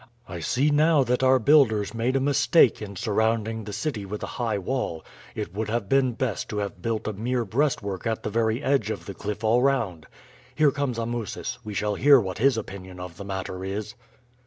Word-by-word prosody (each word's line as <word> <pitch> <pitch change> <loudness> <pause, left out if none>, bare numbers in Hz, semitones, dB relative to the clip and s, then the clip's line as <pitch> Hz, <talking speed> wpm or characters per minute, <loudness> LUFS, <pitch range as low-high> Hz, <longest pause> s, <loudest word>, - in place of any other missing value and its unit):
I 85 -2 -6
see 135 - +1
now 150 0 +4
that 125 0 0
our 130 0 +5
builders 120 -6 +4
made 120 +3 0
a - - +3
mistake 140 -1 +4
in 100 -2 -7
surrounding 110 0 0
the 105 - -6
city 105 +1 -3
with 100 +2 -6
a - - -5
high 110 -3 0
wall; 95 -5 -3 0.3
it - - -5
would 110 +2 -3
have 110 -2 -1
been 135 0 +2
best 120 -3 -3
to 105 - -4
have 100 -2 -4
built 115 +2 -2
a 110 - -2
mere 120 +4 -1
breastwork 110 -4 -1
at 110 -1 -2
the - - -3
very 115 +3 0
edge 135 -6 +1
of 110 - -4
the 100 - -6
cliff 105 +3 -5
all 115 +3 +3
round. 110 - 0 0.5
Here 150 -2 +4
comes 140 -5 -2
Amusis; 115 -2 -4
we 105 -1 -6
shall 105 +1 0
hear 140 +6 +6
what 95 -4 -4
his 130 0 +3
opinion 95 -4 -7
of 90 -1 -8
the 100 - -7
matter 95 -1 -5
is." 100 +2 -4
110 Hz, 205 wpm, -25 LUFS, 100-130 Hz, 0.5 s, hear